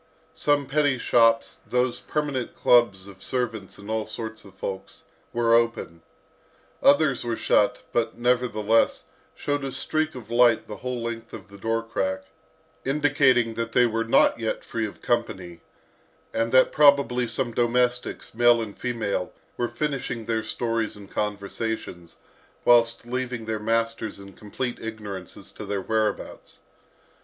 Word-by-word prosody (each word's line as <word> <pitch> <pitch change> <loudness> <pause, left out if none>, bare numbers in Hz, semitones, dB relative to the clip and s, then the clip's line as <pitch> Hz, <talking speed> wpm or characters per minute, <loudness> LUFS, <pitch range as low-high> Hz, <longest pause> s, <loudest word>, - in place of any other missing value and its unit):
Some 145 -1 +1
petty 145 -1 +2
shops, 115 -1 +3
those 125 0 +1
permanent 145 -5 -3
clubs 100 -6 +3
of 100 -1 -13
servants 115 -6 -3
and 100 - -12
all 110 0 -2
sorts 110 -1 -6
of 95 -2 -16
folks, 95 0 -6 0.3
were 115 -1 +2
open. 115 -8 +1 0.8
Others 140 -2 +4
were 115 -1 -2
shut, 125 +4 +2
but, 120 - 0
nevertheless, 120 -3 +2 0.3
showed 145 -1 -2
a 135 - -3
streak 155 +4 -1
of 120 -2 -10
light 120 -1 +4
the 105 - -7
whole 125 -1 -4
length 115 -1 -5
of - - -9
the 100 - -12
door 115 +2 -1
crack, 95 -4 -2 0.6
indicating 135 -4 +3
that 115 0 -4
they 125 - +5
were 115 -1 0
not 115 0 +3
yet 110 -1 -2
free 110 -1 -2
of 100 - -13
company, 95 -8 -2 0.7
and 115 0 0
that 130 0 +5
probably 140 -4 +4
some 120 +1 -1
domestics, 125 +1 0
male 120 +1 +5
and 110 -3 -6
female, 110 -7 -2 0.2
were 120 - -1
finishing 125 -3 -3
their 110 0 0
stories 115 0 -2
and 100 -1 -13
conversations, 100 -4 -4 0.5
whilst 115 -1 +4
leaving 125 -1 -3
their 110 -1 -2
masters 115 0 -1
in 100 0 -12
complete 120 +5 -5
ignorance 105 -5 -7
as - - -12
to - - -9
their 100 -1 -2
whereabouts. 110 +1 -2
115 Hz, 145 wpm, -25 LUFS, 110-125 Hz, 0.8 s, they